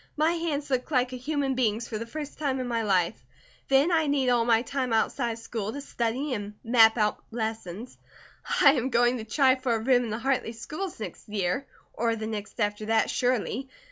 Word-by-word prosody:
My 310 +2 +3
hands 315 -4 -2
look 255 +2 0
like 255 -3 +1
a - - -3
human 275 +1 -1
being's 230 -3 0
for 215 - -4
the 230 - -5
first 295 +4 -7
time 275 -3 0
in 255 - -3
my 230 -1 0
life; 180 - +1 0.4
then 275 +5 +4
I 320 -2 +2
need 275 -3 +2
all 240 -2 +3
my 230 -1 +3
time 260 -3 -2
outside 235 +2 +1
of - - -9
school 225 -2 -4
to 280 - -6
study 255 +1 -2
and 205 -2 -5
map 225 -1 +6
out 210 -1 0
lessons. 220 -1 -5 0.6
I 280 - +8
am 260 -2 0
going 240 0 +3
to - - -5
try 260 +3 +3
for 255 -3 0
a - - +1
room 245 +1 +3
in - - -5
the 215 - -2
Hartley 250 -2 -1
schools 310 +10 -6
next 215 - -8
year, 205 +5 -1 0.3
or 230 0 0
the 220 -1 -5
next 215 0 -6
after 210 0 -1
that, 225 0 +2
surely. 255 +2 -1
240 Hz, 210 wpm, -27 LUFS, 220-270 Hz, 0.6 s, I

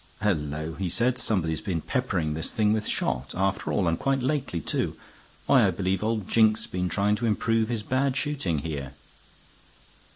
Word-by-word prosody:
"Hullo!" 80 -4 -1
he 95 -2 -1
said. 120 +7 +1
"Somebody 95 -9 0
has 80 - -3
been 90 -5 -2
peppering 90 - -1
this 80 +2 -3
thing 105 -1 +2
with 110 -1 -1
shot, 65 +2 -1
after 95 +1 0
all, 95 -4 +1
and 80 0 +1
quite 135 -1 0
lately, 130 - -1
too. - - -2 0.5
Why, - - +5
I - - +3
believe 95 0 -1
old 110 -3 -1
Jink's 110 -1 +4
been 90 0 -2
trying 100 +2 +2
to 115 - -1
improve 110 +1 +1
his 115 -3 -1
bad 130 +2 0
shooting 140 - -1
here." 70 -4 -4
105 Hz, 175 wpm, -26 LUFS, 85-115 Hz, 0.5 s, Why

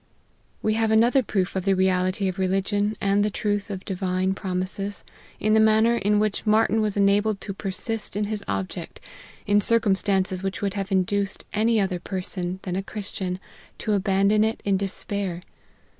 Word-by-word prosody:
We 215 - +2
have 225 0 +1
another 235 +5 +4
proof 195 -5 -1
of 190 - -1
the 195 0 +2
reality 185 +1 +1
of 190 +1 -3
religion, 195 +3 0
and 200 +1 +2
the 210 - +1
truth 205 0 -2
of 195 -2 -5
the - - -23
Divine 185 0 -1
promises, 195 +2 -3 0.4
in 215 0 +2
the 220 - +5
manner 220 +2 +4
in 210 -2 +1
which 210 -1 0
Martyn 220 0 +3
was 210 -1 -1
enabled 200 +1 +2
to 195 - -5
persist 205 +3 -3
in 210 - 0
his 210 0 -3
object, 95 -1 -4 0.5
in 205 0 +3
circumstances 195 -4 +3
which 195 0 -3
would 200 -2 -1
have 195 0 -4
induced 195 +1 0
any 220 +1 +2
other 190 -3 0
person, 185 0 -4
than 180 -2 -3
a 190 - 0
Christian, 195 -2 -5 0.4
to 215 - -1
abandon 200 +1 +3
it 220 +1 0
in 200 -1 +2
despair. 195 -2 -3
200 Hz, 175 wpm, -24 LUFS, 190-210 Hz, 0.5 s, the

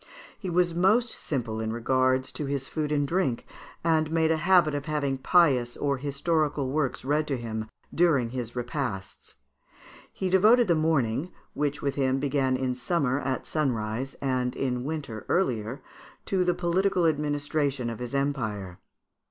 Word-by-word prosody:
He 190 - -4
was 175 0 +2
most 215 +8 +3
simple 115 -6 -3
as 110 - -2
regards 130 +3 +1
his 140 -2 -2
food 150 -2 -3
and 145 -1 +1
drink, 170 -7 0 0.4
and 160 -2 +2
made 160 0 +2
a 160 - +2
habit 170 -2 +4
of 145 -1 -3
having 140 -3 -1
pious 130 -7 +3
or 140 -1 0
historical 145 0 0
works 145 -3 -1
read 150 +2 +1
to 135 - -1
him 110 -2 -4 0.3
during 145 -9 +3
his 125 -2 -5
repasts. 120 -6 -4 0.8
He 190 - -3
devoted 220 +5 +5
the 175 - +4
morning, 155 -1 +1 0.2
which 145 -1 -2
with 140 -1 0
him 135 -1 +1
began 135 -2 +1
in 130 -1 -1
summer 135 0 0
at 130 -2 -2
sunrise, 125 -3 -2
and 125 -2 0
in 125 -2 -2
winter 140 -8 -4
earlier, 125 - 0 0.4
to 190 -2 +1
the 180 -1 +1
political 180 +1 +1
administration 145 -3 0
of 115 -2 -4
his 125 +2 -5
empire. 110 -10 -2
140 Hz, 150 wpm, -27 LUFS, 125-160 Hz, 0.8 s, devoted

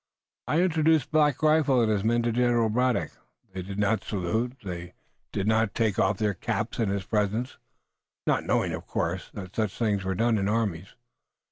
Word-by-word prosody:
I 160 - +2
introduced 160 -4 +2
Black 150 -2 +2
Rifle 155 -4 +4
and 115 -2 +2
his 100 -2 0
men 120 +2 +2
to 120 - +1
General 120 -1 +2
Braddock. 125 +2 +1 0.4
They 95 - -4
did 95 +2 -7
not 105 0 +1
salute. 110 +5 -1
They 90 -2 -7 0.4
did 100 - -2
not 110 -1 +1
take 110 -5 +1
off 95 +1 +2
their 105 0 0
caps 85 - -3
in 110 -4 +1
his 100 -1 -2
presence, 110 +4 -1 0.7
not - - +1
knowing, - - 0
of - - -6
course, 85 +3 -2
that 95 -2 -8
such 110 -3 -1
things 105 -4 0
were 95 0 -2
done 115 +2 +2
in 100 +1 0
armies. 100 -5 -2
110 Hz, 180 wpm, -27 LUFS, 100-120 Hz, 0.7 s, Rifle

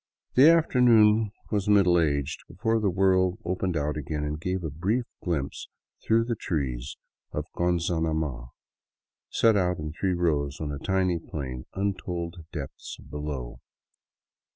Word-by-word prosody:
The 135 +5 +8
afternoon 115 -9 +5 0.2
was 105 -1 0
middle 95 -4 +5
aged 70 -4 0
before 110 +6 0
the 105 -2 +1
world 95 0 +2
opened 90 -1 -1
out 75 +1 -1
again 75 0 -3
and 75 +1 -3
gave 90 +1 -2
a 80 - -3
brief 100 - 0 0.2
glimpse 75 -6 -3 0.3
through 115 +1 +3
the 120 - -1
trees 70 - -3 0.3
of - - -3
Gon 90 0 +2
zanama, 80 -7 -1 0.8
set 115 -2 +4
out 90 -2 +1
in 75 0 -5
three 95 +2 0
rows 75 -5 0
on 75 -2 -3
a 70 - -5
tiny 95 -1 +1
plain 65 -6 -6
untold 90 -4 -3
depths 75 -5 -7
below. 70 -5 -5
85 Hz, 140 wpm, -27 LUFS, 75-95 Hz, 0.8 s, The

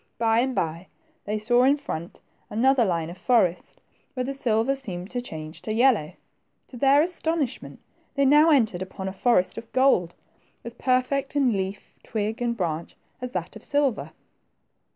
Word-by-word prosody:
By 225 0 +2
and 255 +1 0
by, 165 +2 -2 0.4
they 210 +1 -2
saw 240 +3 +2
in 275 +3 +4
front 170 - -7 0.3
another 255 +4 +3
line 170 -5 -1
of 180 - -12
forest, 190 -9 +1 0.4
where 255 - -1
the 270 +2 -3
silver 245 -1 +1
seemed 190 -8 -7
to 245 - -2
change 155 -8 -8
to 215 - -5
yellow. 230 - +3 0.6
To 250 - -10
their 275 +3 +5
astonishment, 320 -6 -3 0.4
they 280 -1 +2
now 295 +4 +6
entered 220 - +2
upon 190 +1 -6
a 190 - -4
forest 190 -2 +1
of 230 - -15
gold, 255 -10 +3 0.5
as 235 - -7
perfect 255 +3 0
in 270 -5 +3
leaf, 195 0 -4
twig, 220 +2 -3
and 235 -1 -1
branch, 170 -4 -3 0.2
as 250 0 -5
that 180 +2 -4
of 220 - -11
silver. 285 -5 0
235 Hz, 165 wpm, -25 LUFS, 190-270 Hz, 0.6 s, now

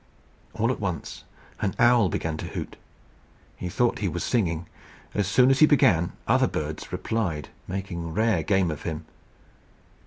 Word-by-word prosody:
All 115 +2 +1
at - - -3
once 90 -6 -4 0.3
an 100 -3 -1
owl 120 -5 +5
began 80 0 -2
to - - -5
hoot. - - -6 0.8
He 90 - -5
thought 120 +6 +1
he 105 - 0
was 85 0 -3
singing. 85 -8 0 0.5
As 100 -2 0
soon 125 +6 +5
as 135 - +2
he 155 - +8
began, 85 - +4
other - - +4
birds 75 0 -4
replied, 90 -11 -2 0.2
making 90 -3 -4
rare 110 -1 +2
game 95 0 +2
of 75 - -6
him. 80 -1 -4
95 Hz, 155 wpm, -26 LUFS, 85-115 Hz, 0.8 s, he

